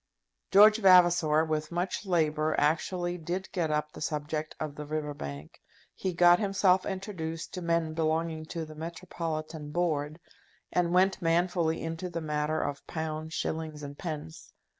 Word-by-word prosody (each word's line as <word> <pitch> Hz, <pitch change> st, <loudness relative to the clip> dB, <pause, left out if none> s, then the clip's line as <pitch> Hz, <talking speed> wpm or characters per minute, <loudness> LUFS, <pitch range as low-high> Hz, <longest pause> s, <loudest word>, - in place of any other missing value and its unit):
George 210 Hz, +2 st, +7 dB
Vavasor, 175 Hz, -5 st, +5 dB
with 155 Hz, 0 st, -2 dB
much 180 Hz, +3 st, -2 dB
labour, 155 Hz, -3 st, +1 dB
actually 175 Hz, +3 st, 0 dB
did 175 Hz, +4 st, -4 dB
get 170 Hz, -4 st, -1 dB
up 150 Hz, 0 st, -1 dB
the -, -, -11 dB
subject 150 Hz, +1 st, -3 dB
of 155 Hz, -2 st, -3 dB
the 150 Hz, -, -7 dB
River 150 Hz, 0 st, -3 dB
Bank. 70 Hz, -, -8 dB, 0.3 s
He 185 Hz, -, -2 dB
got 175 Hz, 0 st, +6 dB
himself 195 Hz, -2 st, +2 dB
introduced 185 Hz, -5 st, -5 dB
to 180 Hz, -, -4 dB
men 170 Hz, -2 st, 0 dB
belonging 160 Hz, 0 st, -1 dB
to 165 Hz, 0 st, -5 dB
the 155 Hz, -, -10 dB
Metropolitan 160 Hz, -2 st, -5 dB
Board, 155 Hz, -2 st, -1 dB, 0.5 s
and 175 Hz, -1 st, +2 dB
went 190 Hz, +2 st, +3 dB
manfully 170 Hz, -1 st, +1 dB
into 165 Hz, +2 st, -4 dB
the 170 Hz, -1 st, -4 dB
matter 150 Hz, 0 st, -1 dB
of 145 Hz, -1 st, -3 dB
pounds, 160 Hz, 0 st, -4 dB
shillings, 155 Hz, -2 st, -3 dB
and 140 Hz, 0 st, -7 dB
pence. 150 Hz, -, -7 dB
160 Hz, 150 wpm, -29 LUFS, 155-175 Hz, 0.5 s, George